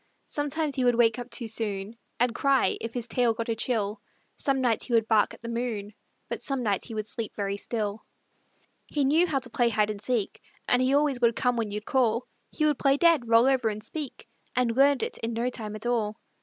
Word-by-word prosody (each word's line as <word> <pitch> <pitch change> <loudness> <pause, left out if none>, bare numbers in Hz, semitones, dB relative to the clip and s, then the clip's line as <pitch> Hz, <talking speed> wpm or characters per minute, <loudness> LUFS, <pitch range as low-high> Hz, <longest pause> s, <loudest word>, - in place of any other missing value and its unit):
Sometimes 295 +1 -1
he 260 - 0
would 245 -1 +4
wake 230 0 +3
up 245 0 -7
too 235 - -4
soon 210 -1 -3 0.2
And 245 0 +2
cry, 275 +1 +2
if 230 +1 -5
his 240 -1 -3
tail 235 -1 +1
got 230 +1 -4
a 225 - +1
chill; 215 -3 -1 0.3
Some 275 -2 +1
nights 240 -4 +1
he 245 - -3
would 225 -1 +3
bark 220 -2 +3
at - - -21
the 230 - -7
moon, 230 -3 -3 0.3
But - - -4
some 275 -3 -1
nights 205 -4 0
he 230 - -7
would 215 -1 -2
sleep 220 0 -4
very 200 -1 -2
still. 210 0 -3 0.8
He 290 -2 0
knew 320 +6 +4
how 300 -4 0
to 255 -2 -2
play 240 0 +2
hide 215 -1 +1
and 205 -1 -7
seek 230 -4 -1 0.3
And 250 - +3
he 260 +2 +3
always 285 -3 +2
would 235 -1 +4
come 250 -1 +1
when 225 -3 -1
you'd 210 +1 -5
call; 245 -3 +1 0.2
He 305 - -1
would 295 -3 +2
play 275 0 +3
dead, 325 -7 +4
roll 230 +1 +5
over 260 -4 +3
and 215 0 -5
speak, 290 +3 -6 0.3
And 245 -2 +1
learned 275 0 +4
it - - -3
in 230 +1 -3
no 235 +2 -1
time 215 -3 -6
at 215 - -6
all. 225 -3 0
235 Hz, 230 wpm, -27 LUFS, 220-260 Hz, 0.8 s, roll